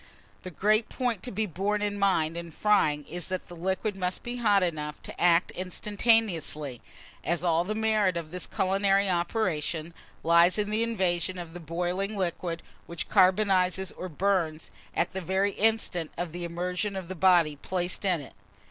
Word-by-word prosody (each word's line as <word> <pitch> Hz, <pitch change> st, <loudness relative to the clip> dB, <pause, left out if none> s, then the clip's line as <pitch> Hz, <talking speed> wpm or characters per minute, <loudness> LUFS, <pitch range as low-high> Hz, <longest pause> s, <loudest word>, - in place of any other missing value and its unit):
The 185 Hz, -, -7 dB
great 215 Hz, +6 st, +1 dB
point 245 Hz, -7 st, -1 dB
to 250 Hz, -, -5 dB
be 215 Hz, +2 st, -1 dB
borne 205 Hz, +3 st, -1 dB
in 205 Hz, -1 st, -2 dB
mind 170 Hz, -5 st, +2 dB
in 170 Hz, 0 st, -6 dB
frying, 155 Hz, -6 st, +2 dB
is 175 Hz, +1 st, -3 dB
that 185 Hz, -1 st, -4 dB
the 175 Hz, -, -10 dB
liquid 190 Hz, +4 st, -2 dB
must 185 Hz, -1 st, -2 dB
be 240 Hz, +1 st, -4 dB
hot 205 Hz, -5 st, +3 dB
enough 150 Hz, -4 st, -3 dB
to -, -, -8 dB
act 175 Hz, 0 st, +4 dB
instantaneously, 185 Hz, -, +1 dB, 0.4 s
as 170 Hz, 0 st, -1 dB
all 170 Hz, -1 st, +2 dB
the 210 Hz, +4 st, -3 dB
merit 215 Hz, -4 st, +2 dB
of 160 Hz, -2 st, -6 dB
this 180 Hz, 0 st, -3 dB
culinary 195 Hz, +1 st, +2 dB
operation 170 Hz, -3 st, -1 dB, 0.3 s
lies 170 Hz, +3 st, +5 dB
in 210 Hz, 0 st, -1 dB
the 215 Hz, +1 st, +1 dB
invasion 185 Hz, -5 st, 0 dB
of 170 Hz, -2 st, -7 dB
the 175 Hz, -, -7 dB
boiling 180 Hz, +5 st, -2 dB
liquid, 170 Hz, -2 st, -2 dB, 0.2 s
which 170 Hz, -1 st, -5 dB
carbonizes 190 Hz, -1 st, +3 dB
or 185 Hz, -, -7 dB
burns, 165 Hz, -2 st, -1 dB, 0.2 s
at 170 Hz, -, +1 dB
the 190 Hz, -, -4 dB
very 190 Hz, +3 st, +1 dB
instant 210 Hz, -7 st, 0 dB
of 175 Hz, -1 st, -3 dB
the 175 Hz, +1 st, -4 dB
immersion 180 Hz, +4 st, -2 dB
of 190 Hz, -2 st, -5 dB
the 185 Hz, -, -5 dB
body 170 Hz, -4 st, +4 dB
placed 180 Hz, +6 st, -2 dB
in 180 Hz, -5 st, +2 dB
it. 140 Hz, -, -11 dB
185 Hz, 175 wpm, -28 LUFS, 170-200 Hz, 0.4 s, lies